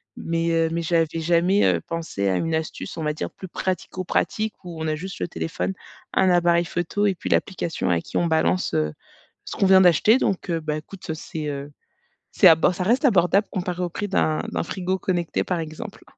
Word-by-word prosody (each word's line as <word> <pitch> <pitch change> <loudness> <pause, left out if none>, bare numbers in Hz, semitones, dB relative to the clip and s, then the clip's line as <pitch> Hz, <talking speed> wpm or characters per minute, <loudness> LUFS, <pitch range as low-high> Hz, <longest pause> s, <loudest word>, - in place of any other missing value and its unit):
mais 165 0 -1
heu, 165 -1 +2
mais 170 0 -1
j'avais 165 -1 +2
jamais, 175 +4 +3
heu, - - +2
pensé 165 -12 -3
à 95 - +1
une 165 0 -1
astuce, 160 -1 -4
on 160 - -3
va 150 0 0
dire 155 - -4
plus 190 - -10
pratico-pratique 185 +4 -2
où 170 -3 -8
on 160 - -2
a 155 - 0
juste 185 +4 -7
le - - -1
téléphone, 170 +3 -3 0.4
un 190 -1 +3
appareil 175 0 +3
photo 175 +5 -1
et 195 - +1
puis - - -6
l'application 170 - -1
à 85 -2 +2
qui - - -5
on 175 - +2
balance, 160 +3 +1
heu, 75 0 0 0.5
ce - - -7
qu'on - - +3
vient 190 0 +7
d'acheter, 185 - +5
donc 190 -1 -1
heu, 165 - 0
bah, 155 -1 -2
écoute, 160 +2 -8
c'est, 155 -1 -6
heu, 140 0 -5 0.6
c'est 190 - +6
abo 165 +1 +6
ça 180 - -3
reste 245 +8 +2
abordable 195 -2 +3
comparé 180 -1 -3
au 175 - -1
prix 205 +5 -4
d'un 155 -5 +1
d'un - - -1
frigo 185 +2 -2
connecté, 175 -3 -1
par 180 -2 -1
exemple. 160 +7 -7
170 Hz, 210 wpm, -23 LUFS, 160-185 Hz, 0.6 s, vient